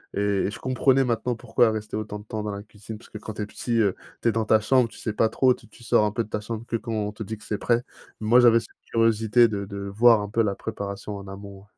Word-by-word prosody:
et - - 0 0.3
et - - -3
je - - -7
comprenais 130 +1 +2
maintenant 120 0 -1
pourquoi 120 +1 +2
elle 110 - +1
restait 110 0 -4
autant 110 -1 -5
de - - -12
temps 110 0 -4
dans 105 - -3
la 100 0 -6
cuisine, 105 +1 -10
parce 110 - -17
que 105 - -7
quand 110 - -7
tu 105 - -3
es - - -3
petit, 115 +3 -3
heu, 100 -4 +2 0.3
tu 120 - +4
es - - +3
dans 110 0 -1
ta 110 0 +4
chambre, 125 +1 +3
tu - - -15
sais 110 - -3
pas 110 +1 +2
trop, 130 +3 +3
tu - - -15
tu 120 - -17
sors 110 - +3
un 105 - 0
peu 115 +2 -1
de - - -14
ta 105 - -3
chambre 110 +1 -6
que 120 - -3
quand 115 0 -4
on 105 -1 -1
te 105 +2 -13
dit 110 +2 -6
que 105 - -17
c'est 105 - -3
prêt. 120 0 +1 0.4
Moi, 110 +3 +5
j'avais 115 -2 +6
cette 115 - -11 0.2
curiosité 115 +1 +4
de 100 -2 -3
de 100 0 -8
voir 110 +2 +5
un 105 - -5
peu 115 +2 +1
la 100 -2 0
préparation 100 -1 -5
en 100 - -10
amont. 100 0 -10
110 Hz, 300 wpm, -25 LUFS, 105-115 Hz, 0.4 s, j'avais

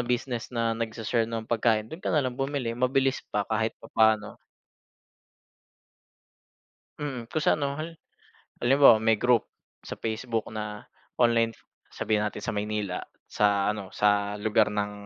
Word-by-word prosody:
business 125 0 -2
na 115 -2 0
nagse-share 115 0 -1
ng 115 -1 -4
pagkain 110 -1 +1
do'n 160 - -7
ka - - -2
nalang 140 -6 +1
bumili 135 -2 -2
mabilis 130 +2 +1
pa 105 -1 -1
kahit 110 +1 -1
papaano. 110 -2 +1 2.6
Mm, 130 -5 -4
kung 155 +6 -2
sa - - +3
ano, 140 -1 -1
hal 160 +2 -6 0.7
halimbawa 135 -1 +7
may 110 -2 +3
group 125 -2 +3 0.4
sa - - -8
Facebook 115 0 -2
na 105 -1 -6 0.3
online. 115 -1 +4 0.4
Sabihin 110 -1 0
natin 105 - -3
sa - - -2
Maynila, 105 -2 -2 0.3
sa 100 -1 +2
ano 100 -3 -7
sa 105 0 +1
lugar 110 0 +3
ng 105 0 -1
115 Hz, 135 wpm, -27 LUFS, 105-125 Hz, 2.6 s, halimbawa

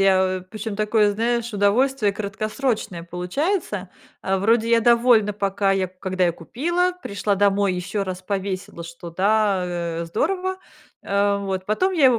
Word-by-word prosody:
я 185 -1 +3
причем 215 -1 -5
такое, 210 0 +2
знаешь, 235 +2 -1
удовольствие 210 +2 +2
краткосрочное 215 -1 -3
получается. 190 - -2 0.3
Э, 190 0 0
вроде 225 +3 +2
я 230 0 +5
довольна 235 -2 +4
пока 200 -1 0
я, 190 -1 +1
когда 185 0 -2
я 170 - +2
купила, 345 - -1
пришла 200 0 -1
домой, 200 -1 +2
еще 195 +3 -2
раз 185 -1 -5
повесила, 190 -3 -4
что 170 0 -9
да, 200 +1 +2
э, 170 -1 -3
здорово, 370 - -1 0.5
э, 200 0 +1
вот. 190 -2 -3
Потом 370 - +1
я 310 -7 +5
его 250 -3 +4
200 Hz, 150 wpm, -22 LUFS, 185-230 Hz, 0.5 s, я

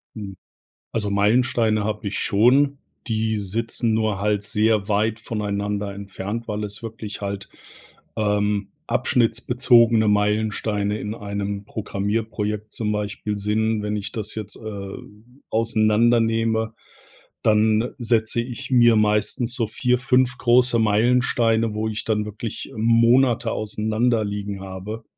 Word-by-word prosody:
Hm. 100 -3 -7 0.6
Also 105 -3 -1
Meilensteine 110 +1 +2
habe 105 0 -2
ich 100 - -4
schon. 135 +7 +3 0.3
Die 110 -1 0
sitzen 115 +3 -2
nur 110 -3 0
halt 105 -1 +1
sehr 105 0 +1
weit 110 +2 +1
voneinander 105 -2 -3
entfernt, 100 +3 -6
weil 105 0 -2
es 105 +2 -5
wirklich 110 -2 -7
halt, 100 0 -5 0.7
ähm, 105 -1 0 0.2
abschnittsbezogene 115 -1 +3
Meilensteine 105 0 0
in 105 +1 -4
einem 100 -1 -4
Programmierprojekt 105 +1 -3
zum 105 -2 -2
Beispiel 105 0 -3
sind. 110 +1 0
Wenn 105 0 -2
ich 100 0 -5
das 110 -3 -5
jetzt, 105 -2 -6
äh, 100 -3 -7 0.5
auseinandernehme, 115 0 +2 0.7
dann 110 +2 +3
setze 115 -1 +1
ich 130 +2 -7
mir 120 -2 +6
meistens 105 +3 +1
so 120 -4 +1
4, 125 +3 0
5 125 -1 +2
große 125 -1 +4
Meilensteine, 115 0 +2
wo 110 +1 -1
ich 110 0 -4
dann 105 -1 0
wirklich 105 +1 -6
Monate 115 +1 +3
auseinander 110 +2 0
liegen 100 -1 -4
habe, 95 +4 -7
110 Hz, 120 wpm, -22 LUFS, 105-115 Hz, 0.7 s, mir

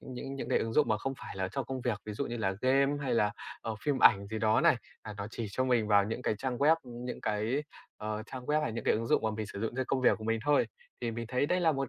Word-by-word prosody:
những 135 +1 -7
những 125 -3 -5
cái - - +3
ứng 115 - -2
dụng 150 +5 +3
mà 105 -1 +2
không 135 +4 -2
phải - - -8
là 95 -1 -1
cho 135 - -1
công 130 0 -5
việc, 120 -4 -1
ví 105 - -5
dụ 140 +7 -2
như 120 - -4
là 95 -4 0
game 135 +2 +3
hay 125 -3 0
là, 105 -2 +2 0.3
ờ, 115 - -3
phim 145 -3 +1
ảnh 100 0 +6
gì 110 +1 -4
đó 110 0 +3
này. - - +5 0.3
À, 105 - -7
nó 100 0 -4
chỉ 115 -1 -4
cho 130 +6 0
mình 120 -4 +2
vào 100 -1 +5
những 115 +4 -4
cái 110 - +1
trang 130 -2 -2
web, 155 +3 +5
ưm, 120 -1 -9
những 125 - -5
cái, 110 +7 0 0.3
ờ, 110 0 -4
trang 130 -2 -7
web 150 +1 +2
hay 115 - -1
những 115 - -5
cái - - +4
ứng 115 +1 -2
dụng - - +3
mà 110 - +1
mình 110 -1 -4
sử 100 - -7
dụng 115 +1 -2
cho 130 - 0
công 135 - 0
việc 125 - +4
của 110 - -8
mình 115 0 +1
thôi. 145 -1 +4 0.3
Thì 115 - -1
mình 115 0 -5
thấy 130 +3 +1
đây 180 +3 +1
là 165 -2 +4
một 135 -3 -2
120 Hz, 315 wpm, -31 LUFS, 110-135 Hz, 0.3 s, ảnh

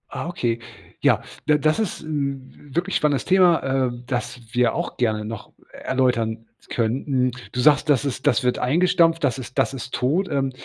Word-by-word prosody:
Ah, - - -5
okay. 120 -9 -1 0.4
Ja, - - +3 0.2
d 150 - +5
das 155 +4 +3
ist 215 -4 -2
'n 140 -2 -5
wirklich 180 +3 -1
spannendes 145 -3 +1
Thema, 180 -3 +4 0.2
äh, - - -3 0.2
das 125 -1 -3
wir 120 -1 +2
auch - - -3
gerne 110 -3 0
noch 110 -1 -7 0.2
erläutern 115 -4 -1 0.2
könnten. 125 +2 0 0.2
Du 125 - -3
sagst, 150 +3 +4
das 145 -1 +3
ist 130 -2 -3
das 135 - +3
wird 125 0 +1
eingestampft. 165 +3 +3
Das 130 -2 +1
ist 120 0 -9
das - - +2
ist 130 -1 -7
tot. 160 +10 +1
Ähm, 135 -3 0
135 Hz, 175 wpm, -23 LUFS, 125-155 Hz, 0.4 s, d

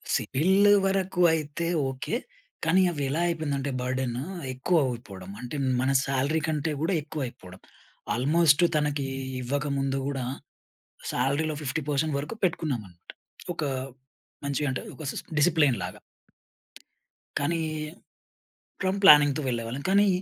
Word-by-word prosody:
సిబిల్ 190 +9 +3 0.2
వరకు 190 -2 0
అయితే 160 +2 -2 0.2
ఓకే. 135 - -3 0.5
కానీ 180 +4 +4
అవి 145 -3 -3
ఎలా 155 +4 -1
అయిపోయిందంటే 145 -4 -1
బర్డెన్ 125 -1 -2 0.4
ఎక్కువ 165 +7 +1
అయిపోవడం 100 -6 -7
అంటే 125 +4 -6 0.3
మన 135 +1 +2
సాలరీ 140 +4 0
కంటే 155 0 -1
కూడా 175 +4 +1
ఎక్కువ 150 0 -6
అయిపోవడం. 95 -5 -13 0.5
ఆల్‌మోస్ట్ 150 +5 +4
తనకి 145 -2 0 0.4
ఇవ్వకముందు 135 +1 -1
కూడా 135 -3 -2 0.9
సాలరీలో 145 +5 0
50% 145 +1 -1
వరకు 150 +11 -5
పెట్టుకున్నాం 155 -9 0
అన్నమాట. 90 -1 -15 0.4
ఒక 155 - -3 0.8
మంచిగ 140 +1 -1
అంటే 130 - -3
ఒక 155 - -9
సిస్ - - -6 0.2
డిసిప్లిన్ 150 - +4
లాగా. - - -6 1.4
కానీ 165 +4 0 1.2
ఫ్రమ్ 190 +1 0
ప్లానింగ్‌తో 150 -3 +8
వెళ్ళేవాళ్ళం. 120 +2 -3
కానీ 200 +1 +5
145 Hz, 115 wpm, -27 LUFS, 130-160 Hz, 1.4 s, ప్లానింగ్‌తో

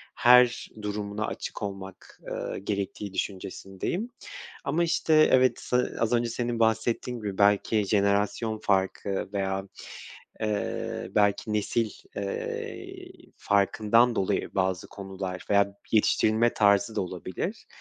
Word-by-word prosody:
her 125 0 +5
durumuna 105 0 -3
açık - - -6
olmak, 95 -2 -8
ııı, - - -4
gerektiği 100 0 -4
düşüncesindeyim 95 - -4 0.5
ama, 165 +5 +1
işte, 160 -1 +4
evet, 130 0 +3
ııı, 125 - +1
az 115 +1 +1
önce 120 0 +2
senin 120 0 -2
bahsettiğin 115 +2 +1
gibi 100 -3 -5
belki 105 +1 +3
jenerasyon 105 +2 +1
farkı 95 0 0
veya, 95 -1 -2 0.7
eee, 105 -1 -2
belki 105 +1 +2
nesil, 105 +1 0 0.3
eee, 100 -1 -5 0.3
farkından 110 +4 +3
dolayı 95 +1 -1
bazı 95 -1 0
konular 95 -2 -6
veya 100 0 +3 0.2
yetiştirilme 110 +1 +3
tarzı 100 +1 +3
da - - +2
olabilir. 95 - -5
105 Hz, 110 wpm, -27 LUFS, 100-115 Hz, 0.7 s, her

